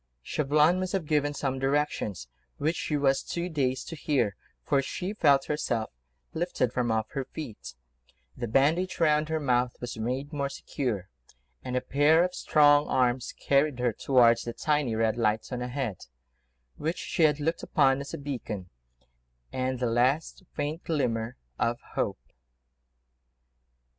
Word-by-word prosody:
Chauvelin 150 Hz, -, +3 dB
must 185 Hz, +1 st, -3 dB
have 190 Hz, -5 st, -1 dB
given 145 Hz, -1 st, +1 dB
some 135 Hz, -2 st, -2 dB
directions, 135 Hz, -, -1 dB, 0.3 s
which 160 Hz, +4 st, 0 dB
she 150 Hz, -, -1 dB
was 135 Hz, -1 st, +2 dB
too 175 Hz, +1 st, -4 dB
dazed 130 Hz, -5 st, -1 dB
to 165 Hz, -, -5 dB
hear, 135 Hz, -10 st, 0 dB, 0.3 s
for 140 Hz, -2 st, +3 dB
she 180 Hz, +8 st, -4 dB
felt 140 Hz, -9 st, +4 dB
herself 120 Hz, -7 st, -1 dB, 0.4 s
lifted 160 Hz, -8 st, -1 dB
from 120 Hz, -2 st, 0 dB
off 110 Hz, 0 st, -1 dB
her 135 Hz, -, -2 dB
feet: 130 Hz, -5 st, -8 dB, 0.6 s
the 120 Hz, -, -4 dB
bandage 155 Hz, -, +2 dB
round 155 Hz, -1 st, +3 dB
her 160 Hz, 0 st, 0 dB
mouth 125 Hz, -3 st, +1 dB
was 120 Hz, -2 st, -6 dB
made 130 Hz, +6 st, -3 dB
more 140 Hz, -1 st, -1 dB
secure, 120 Hz, -, -3 dB, 0.6 s
and 125 Hz, -, -4 dB
a 125 Hz, -, +1 dB
pair 145 Hz, +6 st, +4 dB
of 180 Hz, 0 st, -1 dB
strong 145 Hz, -3 st, +4 dB
arms 125 Hz, -1 st, +1 dB
carried 140 Hz, -1 st, +2 dB
her 125 Hz, -2 st, +1 dB
towards 120 Hz, -1 st, +4 dB
that 120 Hz, 0 st, -5 dB
tiny, 150 Hz, -7 st, +1 dB
red 110 Hz, 0 st, +1 dB
light, 110 Hz, -1 st, +1 dB
on 125 Hz, -1 st, -3 dB
ahead, 125 Hz, -5 st, -4 dB, 0.7 s
which 160 Hz, +3 st, -2 dB
she -, -, -3 dB
had 150 Hz, -2 st, +4 dB
looked 165 Hz, +3 st, -1 dB
upon 135 Hz, -2 st, +2 dB
as 140 Hz, -, -7 dB
a -, -, -4 dB
beacon 115 Hz, -10 st, -5 dB, 0.8 s
and 130 Hz, 0 st, -1 dB
the 125 Hz, -, 0 dB
last 125 Hz, +10 st, +1 dB
faint 150 Hz, +3 st, -3 dB
glimmer 120 Hz, -7 st, -1 dB, 0.2 s
of 120 Hz, 0 st, +1 dB
hope. -, -, -1 dB
135 Hz, 155 wpm, -28 LUFS, 120-150 Hz, 0.8 s, felt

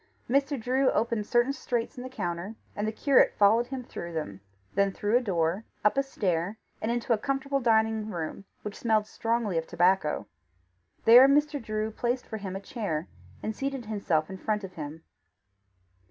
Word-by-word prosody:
Mr. 275 Hz, +1 st, +1 dB
Drew 260 Hz, +4 st, +2 dB
opened 220 Hz, -1 st, 0 dB
certain 240 Hz, +3 st, +3 dB
straits 240 Hz, -4 st, -2 dB
in 245 Hz, -, -7 dB
the 255 Hz, -, -6 dB
counter, 185 Hz, -3 st, -4 dB, 0.2 s
and 210 Hz, +1 st, -1 dB
the -, -, 0 dB
curate 270 Hz, +4 st, +4 dB
followed 220 Hz, +4 st, +5 dB
him 260 Hz, -1 st, -5 dB
through 170 Hz, -7 st, -7 dB
them, 100 Hz, -12 st, -4 dB, 0.3 s
then 200 Hz, 0 st, +2 dB
through 205 Hz, +3 st, 0 dB
a 245 Hz, -, +5 dB
door, 180 Hz, -2 st, 0 dB, 0.2 s
up 210 Hz, -, +5 dB
a 275 Hz, -, +3 dB
stair, 200 Hz, -7 st, -1 dB, 0.2 s
and 220 Hz, -, -1 dB
into 240 Hz, 0 st, +1 dB
a 220 Hz, -, 0 dB
comfortable 275 Hz, +2 st, -1 dB
dining 220 Hz, -2 st, +2 dB
room, 170 Hz, 0 st, -4 dB, 0.2 s
which 210 Hz, -1 st, -6 dB
smelt 220 Hz, -2 st, +2 dB
strongly 225 Hz, -5 st, -1 dB
of 160 Hz, -, -7 dB
tobacco. 175 Hz, -, +2 dB, 0.8 s
There 245 Hz, +4 st, +9 dB
Mr. 295 Hz, 0 st, +2 dB
Drew 215 Hz, 0 st, -2 dB
placed 245 Hz, +3 st, -1 dB
for 220 Hz, -, -5 dB
him 195 Hz, -3 st, -5 dB
a -, -, -3 dB
chair, 200 Hz, -9 st, -3 dB, 0.3 s
and 220 Hz, -, -2 dB
seated 270 Hz, -1 st, -3 dB
himself 185 Hz, -8 st, 0 dB
in 190 Hz, 0 st, -8 dB
front 210 Hz, 0 st, -1 dB
of 190 Hz, -1 st, -7 dB
him. 155 Hz, 0 st, -7 dB
220 Hz, 180 wpm, -28 LUFS, 190-245 Hz, 0.8 s, There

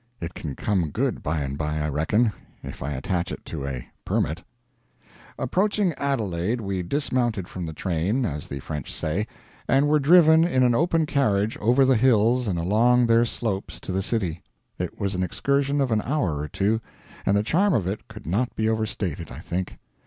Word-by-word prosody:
It 85 Hz, 0 st, -5 dB
can 70 Hz, -4 st, -6 dB
come 95 Hz, -6 st, 0 dB
good, -, -, -1 dB
by 80 Hz, 0 st, -1 dB
and 70 Hz, 0 st, -3 dB
by, 75 Hz, 0 st, -1 dB
I 75 Hz, 0 st, -1 dB
reckon, 100 Hz, -, +1 dB, 0.3 s
if -, -, -8 dB
I 70 Hz, +3 st, -2 dB
attach 85 Hz, +6 st, -2 dB
it -, -, -7 dB
to 70 Hz, -4 st, -5 dB
a 65 Hz, -3 st, -5 dB, 0.2 s
"permit." 80 Hz, +5 st, -1 dB, 1.0 s
Approaching 190 Hz, -, +1 dB
Adelaide 115 Hz, -, -1 dB
we 95 Hz, -4 st, -2 dB
dismounted 120 Hz, -, -1 dB
from 90 Hz, -3 st, -5 dB
the -, -, -4 dB
train, 95 Hz, -, 0 dB
as 75 Hz, -5 st, -4 dB
the 70 Hz, -1 st, -6 dB
French 75 Hz, 0 st, -5 dB
say, 95 Hz, +8 st, -2 dB, 0.4 s
and 135 Hz, +2 st, +4 dB
were 150 Hz, +1 st, +4 dB
driven 160 Hz, +1 st, +6 dB
in 150 Hz, -7 st, +2 dB
an 125 Hz, -1 st, +4 dB
open 165 Hz, +4 st, +2 dB
carriage 110 Hz, -8 st, +1 dB
over 125 Hz, +5 st, +4 dB
the 130 Hz, 0 st, +4 dB
hills 120 Hz, 0 st, +3 dB
and 90 Hz, -4 st, 0 dB
along 115 Hz, +8 st, +3 dB
their 115 Hz, 0 st, +4 dB
slopes 110 Hz, -4 st, -3 dB
to -, -, -5 dB
the 95 Hz, +1 st, 0 dB
city. 95 Hz, -6 st, -1 dB, 0.4 s
It -, -, -4 dB
was 100 Hz, 0 st, -1 dB
an 90 Hz, -, -1 dB
excursion 140 Hz, -, 0 dB
of 135 Hz, -3 st, +1 dB
an 110 Hz, -1 st, +2 dB
hour 120 Hz, -, -1 dB
or 75 Hz, -, -3 dB
two, 105 Hz, +7 st, 0 dB, 0.4 s
and 100 Hz, -, +2 dB
the 105 Hz, -, +2 dB
charm 180 Hz, -, +2 dB
of 105 Hz, -7 st, +1 dB
it 100 Hz, +3 st, -4 dB
could 110 Hz, -1 st, -11 dB
not 105 Hz, +9 st, -1 dB
be 110 Hz, -, 0 dB
overstated, 100 Hz, -7 st, -2 dB
I -, -, -8 dB
think. 90 Hz, +3 st, -4 dB
105 Hz, 190 wpm, -25 LUFS, 85-130 Hz, 1.0 s, driven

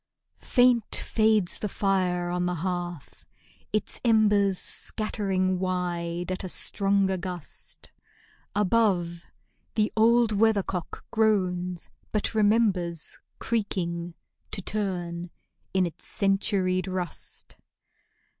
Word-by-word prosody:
Faint 245 Hz, -3 st, +3 dB
fades 215 Hz, -4 st, +2 dB
the 210 Hz, -, -2 dB
fire 180 Hz, -3 st, 0 dB
on 180 Hz, 0 st, 0 dB
the 180 Hz, -, -1 dB
hearth, 175 Hz, -4 st, -4 dB, 0.5 s
its 215 Hz, -, -1 dB
embers 210 Hz, -4 st, +4 dB
Scattering 190 Hz, -4 st, -1 dB
wide 175 Hz, -1 st, -2 dB
at 185 Hz, -, -3 dB
a 185 Hz, -, -4 dB
stronger 195 Hz, 0 st, +1 dB
gust. 180 Hz, -3 st, -7 dB, 0.6 s
Above, 185 Hz, -5 st, +1 dB, 0.5 s
the 215 Hz, -1 st, +1 dB
old 230 Hz, +1 st, +4 dB
weathercock 200 Hz, -4 st, 0 dB
groans, 180 Hz, -5 st, +1 dB, 0.2 s
but 215 Hz, +1 st, 0 dB
remembers 205 Hz, -6 st, +1 dB, 0.2 s
Creaking, 175 Hz, -6 st, -2 dB, 0.3 s
to 195 Hz, -, 0 dB
turn, 175 Hz, -5 st, -2 dB, 0.4 s
in 190 Hz, -1 st, +2 dB
its 170 Hz, -, -7 dB
centuried 195 Hz, -2 st, +1 dB
rust. 185 Hz, -2 st, -6 dB
190 Hz, 95 wpm, -27 LUFS, 180-215 Hz, 0.6 s, embers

